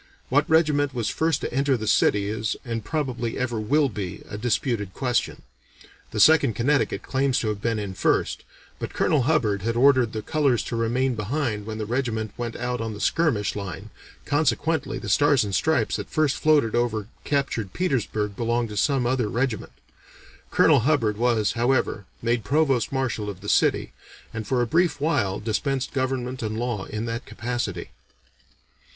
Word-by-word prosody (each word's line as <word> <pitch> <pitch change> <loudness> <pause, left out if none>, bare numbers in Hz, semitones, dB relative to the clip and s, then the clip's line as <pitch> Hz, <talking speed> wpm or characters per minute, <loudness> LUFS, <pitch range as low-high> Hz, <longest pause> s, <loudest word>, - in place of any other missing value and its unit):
What 145 +3 +2
regiment 150 -4 +3
was 115 -3 -1
first 160 -2 0
to - - -4
enter 135 0 +2
the 110 - -5
city 100 -1 +3
is 110 +1 -2
and 115 -2 -3
probably 130 -5 -2
ever 120 -3 -1
will 140 +7 +2
be 100 -5 -6
a 105 - -7
disputed 110 -3 -1
question. 125 -3 -1 0.7
The - - -4
Second 155 -8 +5
Connecticut 140 +5 +1
claims 135 -1 0
to 110 - 0
have 105 -1 -3
been 115 0 0
in 100 -3 -4
first, - - 0 0.4
but - - -6
Colonel 150 - +2
Hubbard 105 -10 +2
had 115 +3 -1
ordered 130 -2 +4
the 110 -1 -4
colors 145 -6 +1
to 120 - -4
remain 120 +3 +1
behind 110 -1 -2
when 110 -1 -4
the 110 - -3
regiment 110 -3 -2
went 120 -1 -4
out 125 0 -3
on 110 -1 -4
the - - -9
skirmish 120 -8 +1
line, 100 +1 -6 0.3
consequently 150 +1 0
the 110 - -7
stars 145 +5 +4
and 100 -1 -4
stripes 160 - +1
that - - -6
first 155 -3 +1
floated 150 -8 +3
over 115 -3 0 0.2
captured 135 -8 -1
Petersburg 110 - -1
belonged 120 0 0
to 105 - -6
some 135 +2 +2
other 120 -3 0
regiment. 120 -1 -2 0.8
Colonel - - +5
Hubbard 120 -5 +1
was, 115 -2 +1
however, 120 -4 0 0.2
made 120 -1 +1
Provost 135 +1 +1
Marshal 130 -6 -2
of 95 -3 -8
the 100 - -8
city, - - +2 0.4
and 110 -1 -5
for 125 -2 +1
a - - +1
brief 165 +5 +1
while 105 -11 0
dispensed 125 +5 -2
government 130 -1 -2
and 110 -1 -3
law 120 -4 -2
in 110 +2 -4
that 115 0 -4
capacity." 110 -7 -4
120 Hz, 170 wpm, -24 LUFS, 110-135 Hz, 0.8 s, Second